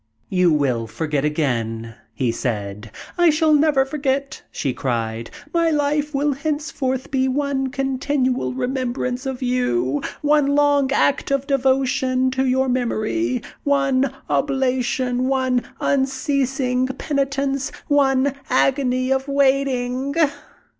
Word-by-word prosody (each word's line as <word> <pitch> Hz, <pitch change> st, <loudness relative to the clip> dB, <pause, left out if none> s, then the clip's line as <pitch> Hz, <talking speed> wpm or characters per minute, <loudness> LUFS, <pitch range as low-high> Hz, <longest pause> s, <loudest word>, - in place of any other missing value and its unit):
"You 180 Hz, -2 st, +3 dB
will 130 Hz, -7 st, +1 dB
forget 150 Hz, +3 st, -2 dB
again," 115 Hz, -7 st, -1 dB, 0.2 s
he 120 Hz, +1 st, 0 dB
said. 105 Hz, -3 st, -4 dB, 0.3 s
"I 345 Hz, -1 st, +6 dB
shall 310 Hz, 0 st, +3 dB
never 295 Hz, -3 st, +4 dB
forget!" 275 Hz, -1 st, -2 dB
she 135 Hz, -3 st, -2 dB
cried. 115 Hz, -3 st, -3 dB, 0.2 s
"My 335 Hz, -1 st, +3 dB
life 295 Hz, -1 st, 0 dB
will 285 Hz, +1 st, +1 dB
henceforth 285 Hz, -3 st, -3 dB
be 265 Hz, -1 st, +1 dB
one 270 Hz, 0 st, 0 dB
continual 265 Hz, -, -1 dB
remembrance 255 Hz, -, -2 dB
of 260 Hz, -1 st, -4 dB
you, 145 Hz, -, 0 dB, 0.2 s
one 295 Hz, -1 st, +3 dB
long 285 Hz, -2 st, +3 dB
act 275 Hz, 0 st, +2 dB
of 275 Hz, -1 st, 0 dB
devotion 260 Hz, -1 st, +1 dB
to 265 Hz, 0 st, 0 dB
your 260 Hz, +1 st, +2 dB
memory, 250 Hz, +2 st, -1 dB, 0.2 s
one 275 Hz, -2 st, +2 dB, 0.2 s
oblation, 255 Hz, -2 st, 0 dB
one 260 Hz, -2 st, +1 dB, 0.2 s
unceasing 265 Hz, -2 st, 0 dB
penitence, 275 Hz, 0 st, -1 dB, 0.2 s
one 275 Hz, -1 st, +3 dB, 0.2 s
agony 255 Hz, -1 st, +1 dB
of 265 Hz, +1 st, 0 dB
waiting!" 270 Hz, -1 st, +1 dB
265 Hz, 115 wpm, -21 LUFS, 245-275 Hz, 0.3 s, I